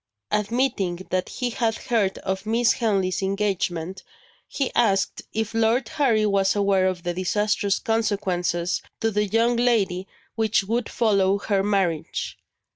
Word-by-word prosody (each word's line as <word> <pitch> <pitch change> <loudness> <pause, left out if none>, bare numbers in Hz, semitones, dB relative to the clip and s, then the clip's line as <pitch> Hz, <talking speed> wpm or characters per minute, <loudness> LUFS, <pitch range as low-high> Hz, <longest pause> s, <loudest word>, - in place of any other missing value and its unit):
Admitting 210 -4 0 0.2
that 185 0 0
he 250 -1 -3
had 225 -1 0
heard 210 -5 0
of 190 0 -3
Miss 230 +1 +3
Henley's 195 -6 0
engagement, 190 -3 -1 0.5
he 275 -3 -2
asked 195 -5 +1
if 220 0 -2
Lord 225 +2 +2
Harry 235 -8 +2
was 195 -1 +2
aware 200 -2 +3
of 180 -2 -3
the 175 -1 -2
disastrous 200 +2 0
consequences 185 -7 -1 0.2
to 225 0 0
the 210 0 0
young 230 +4 +2
lady 200 -6 +1 0.3
which 220 -3 +1
would 230 +4 -1
follow 200 -4 +2
her 200 -1 0
marriage. 195 -6 -1
205 Hz, 135 wpm, -24 LUFS, 190-225 Hz, 0.5 s, Miss